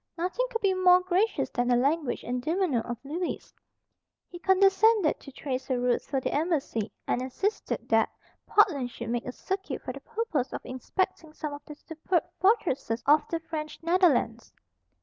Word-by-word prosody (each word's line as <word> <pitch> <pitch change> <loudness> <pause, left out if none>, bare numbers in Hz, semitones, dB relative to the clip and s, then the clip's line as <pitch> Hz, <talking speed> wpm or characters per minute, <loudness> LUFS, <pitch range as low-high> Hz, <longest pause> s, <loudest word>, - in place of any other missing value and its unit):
Nothing 370 +9 -1
could 455 -2 -3
be 395 -2 +3
more 365 -1 +6
gracious 370 +4 0
than 245 -1 0
the 245 - +4
language 280 +3 0
and 250 +1 -2
demeanour 320 -4 +1
of 240 0 -5
Lewis. 335 +6 -4 0.8
He 350 - -8
condescended 390 0 +4
to 275 - -12
trace 260 0 -4
a 260 - +1
route 245 0 +1
for 275 - -2
the - - -2
embassy, 290 - -1
and 245 - 0
insisted 390 - -2
that - - +4 0.4
Portland 295 -12 +3
should 235 -1 -7
make 240 +1 -2
a - - -2
circuit 385 +8 -4
for - - -4
the - - -8
purpose 435 - -2
of - - -4
inspecting 305 +5 -3
some 300 -1 -5
of 285 - -9
the 300 - -9
superb 320 +3 -1 0.2
fortresses 340 - +1
of 295 +1 +4
the 330 - -1
French 310 -2 -5
Netherlands. 325 - +2
315 Hz, 170 wpm, -28 LUFS, 255-370 Hz, 0.8 s, more